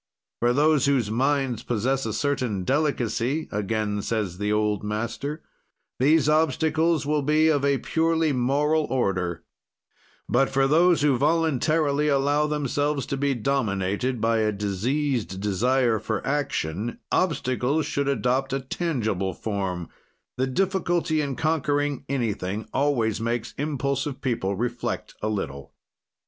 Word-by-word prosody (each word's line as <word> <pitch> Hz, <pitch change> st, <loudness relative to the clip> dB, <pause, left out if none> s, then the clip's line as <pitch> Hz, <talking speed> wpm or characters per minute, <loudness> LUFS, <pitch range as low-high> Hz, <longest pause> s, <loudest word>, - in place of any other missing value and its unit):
"For 120 Hz, +1 st, +3 dB
those 150 Hz, +2 st, +3 dB
whose 125 Hz, -7 st, +1 dB
mind 130 Hz, -1 st, 0 dB
possess 125 Hz, +2 st, 0 dB
a 110 Hz, -, -2 dB
certain 130 Hz, -9 st, -1 dB
delicacy," 135 Hz, -, 0 dB
again 105 Hz, 0 st, -1 dB
says 100 Hz, -5 st, -2 dB
the 105 Hz, 0 st, 0 dB
old 105 Hz, -1 st, +1 dB
master, 115 Hz, +8 st, -3 dB, 0.6 s
"these 150 Hz, +3 st, +4 dB
obstacles 160 Hz, +1 st, +2 dB
will 150 Hz, 0 st, +1 dB
be 155 Hz, +3 st, +3 dB
of 145 Hz, -3 st, +2 dB
a 140 Hz, -1 st, +3 dB
purely 160 Hz, +3 st, +1 dB
moral 145 Hz, +5 st, +1 dB
order, 95 Hz, -10 st, -1 dB, 0.8 s
but 135 Hz, -, +2 dB
for 135 Hz, 0 st, +2 dB
those 165 Hz, +2 st, +4 dB
who 140 Hz, -4 st, +3 dB
voluntarily 155 Hz, -1 st, +2 dB
allow 145 Hz, +1 st, +2 dB
themselves 145 Hz, -1 st, -1 dB
to -, -, -3 dB
be 140 Hz, 0 st, 0 dB
dominated 115 Hz, -1 st, -1 dB
by 115 Hz, +1 st, +2 dB
a 110 Hz, -1 st, +2 dB
diseased 105 Hz, +2 st, -1 dB
desire 115 Hz, +4 st, +1 dB
for 110 Hz, 0 st, -3 dB
action, 120 Hz, -, -2 dB
obstacles 145 Hz, -3 st, +1 dB
should 140 Hz, 0 st, -1 dB
adopt 135 Hz, 0 st, 0 dB
a 135 Hz, -, 0 dB
tangible 115 Hz, -, -2 dB
form; 95 Hz, -5 st, -3 dB, 0.5 s
the 130 Hz, +1 st, 0 dB
difficulty 175 Hz, 0 st, 0 dB
in 140 Hz, -3 st, -2 dB
conquering 145 Hz, -2 st, 0 dB
anything 110 Hz, -6 st, -2 dB
always 120 Hz, -7 st, +1 dB
makes 115 Hz, 0 st, -2 dB
impulsive 140 Hz, -1 st, -2 dB
people 115 Hz, -8 st, -1 dB
reflect 120 Hz, +3 st, -3 dB
a 110 Hz, -, -1 dB
little. 70 Hz, -10 st, -5 dB
135 Hz, 130 wpm, -25 LUFS, 110-145 Hz, 0.8 s, these